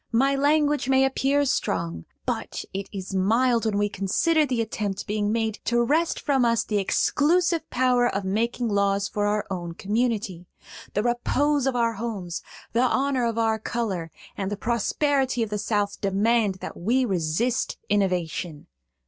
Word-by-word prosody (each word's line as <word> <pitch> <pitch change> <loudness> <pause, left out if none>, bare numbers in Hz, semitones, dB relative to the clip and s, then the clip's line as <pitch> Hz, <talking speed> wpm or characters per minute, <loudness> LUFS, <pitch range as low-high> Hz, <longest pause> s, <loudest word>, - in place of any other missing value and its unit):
"My 270 +4 +3
language 290 -1 +2
may 265 0 +5
appear 275 +2 +1
strong; 85 - -1 0.2
but - - -3
it 195 +1 -4
is 195 -1 -6
mild 230 +5 +2
when 215 -2 0
we 205 0 +2
consider 295 - +1
the 250 -3 -1
attempt 210 -3 -3
being 210 0 -1
made 220 -1 -1
to 240 +2 +2
wrest 320 +7 +1
from 275 -4 +1
us 230 -1 +2
the 210 -2 -1
exclusive 330 - +1
power 250 -1 +2
of 200 - -2
making 230 +5 -1
laws 200 -1 +1
for 205 -1 -1
our 210 0 0
own 175 -2 -4
community. 210 -4 -1 0.5
The 210 - +1
repose 270 +4 +1
of 265 - 0
our 230 -1 +2
homes, 200 -6 -4 0.3
the 235 - +3
honor 255 0 +1
of 230 -1 -3
our 225 -1 +1
color, 200 -8 -3 0.3
and 195 -1 -3
the 205 - -3
prosperity 255 +3 0
of 215 - -5
the 210 - -1
South 205 -1 -1
demand 205 +1 +2
that - - -6
we 245 +8 +1
resist 190 +5 0
innovation. 180 -5 -1
225 Hz, 160 wpm, -25 LUFS, 200-255 Hz, 0.5 s, may